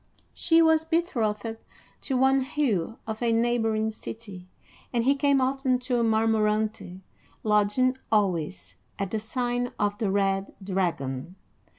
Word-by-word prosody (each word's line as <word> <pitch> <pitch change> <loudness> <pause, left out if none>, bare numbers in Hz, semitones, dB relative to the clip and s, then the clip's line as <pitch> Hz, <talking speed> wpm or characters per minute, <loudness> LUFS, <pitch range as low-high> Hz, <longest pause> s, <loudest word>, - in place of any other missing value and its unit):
She 330 -1 +4
was 320 -1 +4
betrothed 230 - -1 0.4
to 265 - -1
one 265 +1 +4
Hugh 240 - -1
of 220 0 -5
a 235 -1 +2
neighboring 225 -2 +1
city, 205 -4 -9 0.4
and 235 -2 +1
he 270 +3 +4
came 280 -1 +2
often 260 0 +1
to 250 -1 0
Marmorante, 220 -3 +1 0.4
lodging 210 +5 +2 0.2
always 155 - 0 0.2
at 195 -2 -3
the 220 - -1
sign 245 +2 -2
of 205 0 -1
the 215 - 0
Red 195 0 0
Dragon. 175 -6 -2
220 Hz, 125 wpm, -26 LUFS, 200-255 Hz, 0.4 s, She